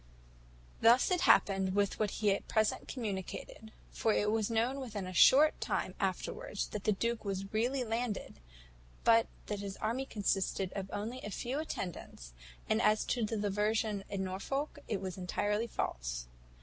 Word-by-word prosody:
"Thus 240 +8 +6
it 360 -1 +2
happened 190 -1 +4
with 200 -1 +1
what 215 -1 +2
he 205 0 +1
at 195 - -2
present 220 -1 +1
communicated; 220 -1 -5 0.2
for 225 - +1
it 210 0 +2
was 220 -1 +1
known 235 +4 +1
within 215 -7 -5
a 185 - -6
short 290 - +6
time - - -1
afterwards - - -2
that 210 - -5
the 215 - +4
duke 230 +3 -1
was 195 0 -4
really 250 +4 +1
landed, 225 - -3 0.6
but 230 0 +5 0.2
that 210 -1 -3
his 200 -1 -5
army 245 +5 -2
consisted 195 -3 -1 0.2
only 225 +5 -4
of - - -9
a - - -4
few 250 +7 -3
attendants; 175 - -6 0.3
and 220 +1 +2
as 215 -2 +3
to 240 - 0
the 220 +1 -1
diversion 210 0 0
in 195 -1 -2
Norfolk, 270 - -3
it 210 - -2
was 190 -1 -5
entirely 205 +5 0
false. - - -3
215 Hz, 160 wpm, -33 LUFS, 195-235 Hz, 0.6 s, Thus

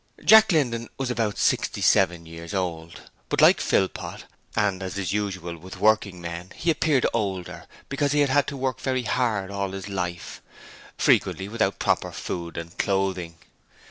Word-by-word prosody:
Jack 220 -1 +8
Linden 120 -8 0
was 130 -2 -2
about 110 -3 -1
sixty - - +1
seven 85 -1 +3
years 85 +3 -8
old, 85 -3 -4 0.3
but - - 0
like - - +6
Philpot, 95 - -1 0.3
and 100 -2 +1
as 95 +1 -5
is 95 -1 -2
usual 95 -5 -3
with 95 +3 -10
working 105 -4 +2
men, 85 +1 -7
he 170 - +1
appeared 155 -4 +2
older, 95 -6 -3 0.2
because 140 0 0
he 150 0 +3
had 140 -2 +2
had 145 +1 +3
to 140 - -4
work 130 -3 -2
very 130 -1 -1
hard 110 -5 0
all 100 -1 -3
his 95 0 -6
life, 90 -3 -4 0.6
frequently 95 - +2
without 105 -2 0
proper - - 0
food 85 -2 -5
and 85 0 -8
clothing. 95 -4 -1
100 Hz, 165 wpm, -25 LUFS, 90-125 Hz, 0.6 s, Jack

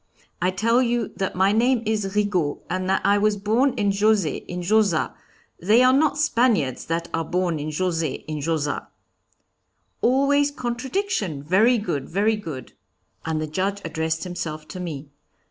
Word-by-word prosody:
'I 180 - +2
tell 230 +4 +3
you 240 -2 0
that 190 - -2
my 190 +2 +3
name 235 +2 +2
is 210 -2 -1
Rigaud, 185 -8 0
and 185 +1 -2
that 190 - +1
I 200 +1 +4
was 210 0 +2
born 225 +7 +1
in 205 -2 +1
Josey, 200 -4 +2
in 180 0 -5
Josas; 200 -3 +2 0.5
they 215 +8 +4
are 255 0 +5
not 290 +1 +2
Spaniards 235 - +1
that 170 +1 -2
are 165 - 0
born 175 -1 -1
in 150 +1 -4
Josey, 165 -2 -2
in 155 -1 -4
Josas.' 150 -2 -2 1.1
'Always 280 +3 +3
contradiction; 245 - -3
very 215 +10 +4
good, 175 -10 -3
very 210 +5 +2
good!' 155 - -8 0.5
And 160 -1 -1
the 155 - -2
Judge 190 +6 -2
addressed 160 0 -2
himself 165 -4 -5
to 185 - -7
me. 155 -5 -6
195 Hz, 160 wpm, -23 LUFS, 165-230 Hz, 1.1 s, are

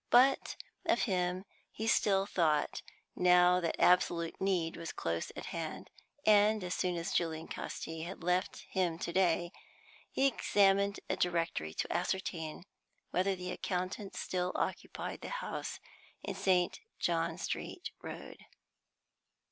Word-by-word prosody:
But 260 +3 +5 0.3
of - - +3
him 180 -2 0 0.3
he 220 - -4
still 195 -3 +3
thought, 160 -7 +1 0.3
now 180 0 +6
that 170 -2 -2
absolute 170 -2 +3
need 180 -4 +1
was 165 -1 -5
close 85 0 -2
at - - -6
hand, - - -5 0.3
and, 210 0 +5
as 180 0 -2
soon 180 -1 0
as 170 +3 -3
Julian 160 -1 0
Casti 160 0 -5
had 175 +1 -6
left 180 +1 0
him 180 -4 +1
to 170 - -4
day, 175 -2 +2 0.6
he 270 - +1
examined 200 -5 +3
a - - 0
directory 165 - 0
to - - -2
ascertain 175 -3 -2 0.5
whether 190 +2 +2
the 180 0 -5
accountant 185 +2 -3
still 180 0 -1
occupied - - -3
the - - -6
house - - -4 0.4
in 200 - -3
St. 185 -2 +2 0.2
John - - 0
Street 355 - -4
Road. - - -8
180 Hz, 130 wpm, -33 LUFS, 170-195 Hz, 0.6 s, now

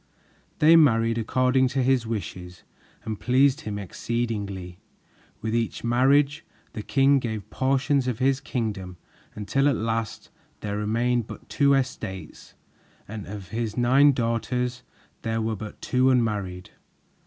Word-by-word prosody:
They 160 +2 +6
married 115 -7 +4
according 130 +3 +2
to 130 - +2
his 125 -3 +2
wishes 90 -5 -6 0.4
and 110 -2 -4
pleased 130 +2 +3
him 105 -1 -5
exceedingly. 100 -3 -4 0.6
With 110 0 -3
each 115 -1 -1
marriage, 140 +5 +3 0.3
the 105 - -5
king 135 +4 +3
gave 110 -5 -4
portions 135 0 +1
of 125 -4 -1
his 135 +1 +2
kingdom, 105 -9 -4 0.4
until 135 +7 +1
at 140 - +1
length 115 0 -3 0.3
there 100 -1 -3
remained 115 +3 0
but - - -10
two 140 -1 +3
estates, 110 -8 -5 0.5
and 105 -1 -7
of 100 -2 -8
his 115 -1 -3
nine 130 +4 +5
daughters 125 0 -1 0.4
there 115 -1 -2
were 110 0 -1
but 105 +1 -8
two 130 +1 +2
unmarried. 105 -8 -1
115 Hz, 130 wpm, -25 LUFS, 105-130 Hz, 0.6 s, They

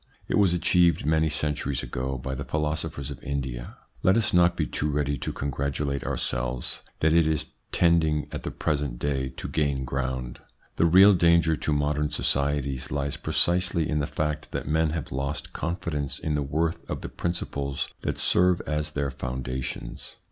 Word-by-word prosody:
It - - +2
was 100 -4 +5
achieved 85 -2 +3
many 80 +1 +2
centuries 75 -3 -1
ago 65 +1 -3
by 65 +1 -4
the 70 +1 -4
philosophers 75 -2 -2
of 65 - -8
India. 65 -4 -4 0.2
Let 95 +3 +4
us 115 - +1
not 90 0 +4
be 80 - +1
too 75 +1 -2
ready 70 -1 0
to - - -3
congratulate 70 0 -2
ourselves - - -1 0.2
that 80 0 +4
it 85 -1 +4
is 80 -2 -1 0.2
tending 80 -3 +3
at - - -5
the - - -4
present 70 -5 -2
day 65 0 -1
to - - -5
gain 70 -3 0
ground. 65 -1 -3 0.4
The 85 - +4
real 95 +4 +8
danger 85 -2 +4
to 75 - -2
modern 75 0 +1
societies 70 -2 0
lies 70 -1 -1
precisely 85 +1 +3
in 75 - 0
the 75 - -1
fact 75 -1 -3
that - - -3
men 80 +1 +2
have 75 -4 -4
lost 70 +3 -3
confidence 80 -4 -2
in 80 - -2
the 75 - +1
worth 80 +4 -1
of - - -3
the - - -5
principles 70 -5 -2
that - - -2
serve 90 0 +4
as 75 0 -2
their 70 -1 -1
foundations. 65 0 -5
75 Hz, 170 wpm, -26 LUFS, 70-80 Hz, 0.4 s, real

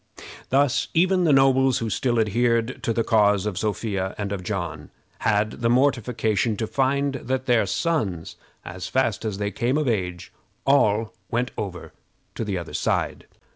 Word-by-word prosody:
Thus 140 0 +2
even 180 +2 +3
the 155 - +4
nobles 135 -1 +4
who 115 -2 -3
still 120 +1 0
adhered 115 +3 +1
to 125 -3 -1
the 115 0 +1
cause 105 -3 +3
of 105 -4 -2
Sophia 100 -3 -2
and 100 -1 -3
of 100 -2 -3
John 85 -6 -4 0.3
had 105 +1 0
the 115 - +2
mortification 120 -4 +1
to 110 - -1
find 140 +3 0
that 130 0 -3
their 115 -5 +3
sons, 100 - -1 0.3
as 90 0 -6
fast 115 0 0
as 105 -3 -2
they 100 0 -2
came 125 +5 0
of 155 -2 0
age, 90 -6 -2 0.3
all 115 -6 +3 0.2
went 120 +2 -1
over 90 -4 -6 0.4
to - - -4
the 100 -3 -2
other 85 - -7
side. - - -1
115 Hz, 165 wpm, -24 LUFS, 100-130 Hz, 0.4 s, the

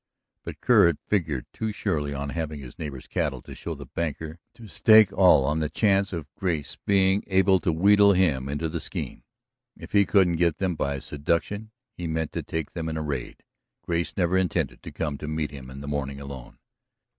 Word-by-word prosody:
But - - -8
Kerr - - +6
had 85 -4 +1
figured 80 -10 -1
too 110 -1 -3
surely 80 -9 -2
on 70 0 -4
having 80 -1 -4
his 65 -3 -11
neighbor's 70 -4 -6
cattle - - -2
to - - -10
show - - -6
the - - -9
banker 80 0 -4 0.2
to 115 -2 -12
stake 110 0 +6
all 90 -8 +5
on 75 +3 0
the 75 -1 -1
chance 100 +3 +2
of 85 -5 -4
Grace 80 -7 -2
being 95 0 +3
able 95 0 +4
to 85 - 0
wheedle 100 +4 +5
him 75 -8 +1
into 75 +3 -2
the 85 +1 -3
scheme. - - -5 0.6
If - - -11
he 100 -2 +4
couldn't 90 -1 +3
get 85 -2 +2
them 95 -2 0
by 70 -3 -2
seduction, 85 +10 -2 0.2
he 90 -5 -5
meant 80 -1 -2
to - - -3
take 80 -2 -4
them 80 -2 -4
in 80 - -3
a 80 - -2
raid. 70 -4 -5 0.4
Grace 85 0 -2
never 90 0 +2
intended 90 -3 -1
to - - -9
come 75 -3 -3
to 75 - -6
meet 75 -1 -2
him 70 -3 -9
in 65 +1 -9
the 70 - -8
morning 70 -1 -3
alone. 70 -3 -9
80 Hz, 205 wpm, -26 LUFS, 75-95 Hz, 0.6 s, Kerr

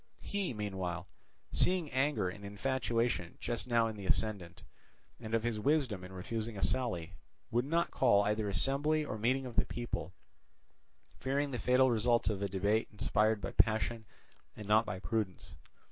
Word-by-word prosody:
He, 200 -5 -2
meanwhile, 95 -5 -3 0.5
seeing 180 -4 +2
anger 135 -5 +1
and 100 +3 -6
infatuation 115 -2 -1
just 120 +1 -3
now 120 -2 +3
in 110 -1 -3
the 100 -2 -7
ascendant, 100 -6 0 0.6
and 110 -1 -2
of 115 - 0
his 120 -2 -1
wisdom 130 -7 +1
in 90 - -9
refusing 110 +4 -4
a - - -5
sally, 110 -11 0 0.4
would 120 +2 +1
not 170 +4 +1
call 100 -6 +4
either 105 0 0
assembly 145 +8 +1
or 110 - -5
meeting 130 +4 +1
of 120 -2 -8
the - - +4
people, 120 -6 -4 1.1
fearing 140 +2 0
the 125 - -3
fatal 130 0 +4
results 120 0 +2
of 100 -2 -4
a 100 - -1
debate 100 +4 +1
inspired 105 0 +1
by - - -4
passion 110 0 +1 0.5
and 105 -2 -8
not 110 +2 +4
by 90 - -3
prudence. 105 -2 -3
110 Hz, 160 wpm, -33 LUFS, 100-130 Hz, 1.1 s, call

